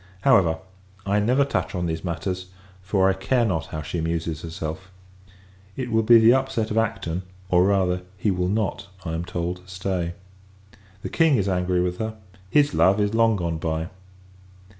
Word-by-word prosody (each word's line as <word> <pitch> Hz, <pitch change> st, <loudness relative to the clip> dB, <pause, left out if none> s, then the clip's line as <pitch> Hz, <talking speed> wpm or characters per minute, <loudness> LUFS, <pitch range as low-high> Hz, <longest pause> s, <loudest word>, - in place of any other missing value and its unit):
However, 85 Hz, -6 st, +4 dB, 0.5 s
I 100 Hz, +1 st, +2 dB
never 125 Hz, +7 st, +3 dB
touch 140 Hz, -, -2 dB
on 90 Hz, -1 st, -1 dB
these 80 Hz, -1 st, -3 dB
matters; 90 Hz, +1 st, -3 dB, 0.3 s
for, 95 Hz, 0 st, +2 dB
I 95 Hz, -, +3 dB
care 120 Hz, +6 st, +1 dB
not 80 Hz, -8 st, -1 dB
how 75 Hz, -1 st, -5 dB
she 85 Hz, +3 st, -4 dB
amuses 80 Hz, -1 st, -2 dB
herself. 80 Hz, +2 st, -6 dB, 0.9 s
It 125 Hz, -2 st, -3 dB
will 110 Hz, 0 st, +3 dB
be 115 Hz, +1 st, +7 dB
the 115 Hz, +1 st, +7 dB
upset 130 Hz, -5 st, 0 dB
of 110 Hz, -, -1 dB
Acton; 105 Hz, -6 st, -2 dB, 0.3 s
or, 90 Hz, 0 st, +4 dB
rather, 95 Hz, -2 st, +1 dB, 0.2 s
he 100 Hz, +2 st, +1 dB
will 90 Hz, -1 st, 0 dB
not, 105 Hz, -1 st, -1 dB, 0.2 s
I 80 Hz, -, -3 dB
am 80 Hz, +1 st, -2 dB
told, 85 Hz, +1 st, -3 dB
stay. 90 Hz, -2 st, -2 dB, 0.9 s
The -, -, -3 dB
King 165 Hz, -3 st, +3 dB
is 100 Hz, -2 st, 0 dB
angry 90 Hz, -1 st, +1 dB
with 90 Hz, 0 st, -2 dB
her; 110 Hz, 0 st, -3 dB, 0.3 s
his 145 Hz, +5 st, +3 dB
love 95 Hz, +2 st, +4 dB
is 105 Hz, +1 st, +1 dB
long 115 Hz, -1 st, +4 dB
gone 85 Hz, -4 st, -2 dB
by. 80 Hz, +1 st, -2 dB
95 Hz, 175 wpm, -24 LUFS, 85-110 Hz, 0.9 s, be